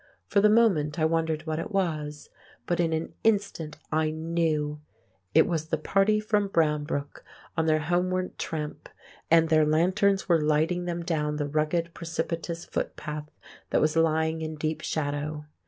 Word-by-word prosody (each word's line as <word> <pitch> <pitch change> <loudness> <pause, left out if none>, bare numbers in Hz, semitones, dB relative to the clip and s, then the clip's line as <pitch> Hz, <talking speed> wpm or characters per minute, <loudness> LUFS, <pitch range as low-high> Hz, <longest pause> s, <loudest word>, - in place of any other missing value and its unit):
For 200 - +2
the 210 - +6
moment 190 -10 +3
I 155 - +2
wondered 160 -1 0
what 160 0 -2
it 165 - -4
was, 155 -6 -2 0.3
but 175 - -1
in 165 -2 +2
an 160 0 -2
instant 200 -8 0
I 155 0 +2
knew; 155 -2 -1 0.5
it - - +7
was 160 -2 -2
the 160 - 0
party 195 +7 +2
from 210 -1 +1
Brownbrook 150 -4 -1 0.3
on 160 -1 +1
their 155 0 +3
homeward 180 +3 -1
tramp, 150 -2 -5 0.4
and 165 0 +5
their 155 -1 +5
lanterns 185 +6 +2
were 170 -4 +4
lighting 155 +4 +1
them 170 -1 -3
down 150 -3 -1
the 145 -1 -2
rugged 155 +3 0
precipitous 170 0 -4
footpath 150 -1 -4 0.4
that - - +2
was 155 +1 +2
lying 160 0 +2
in 155 0 -4
deep 155 0 -2
shadow. 150 0 -3
160 Hz, 155 wpm, -27 LUFS, 155-175 Hz, 0.5 s, it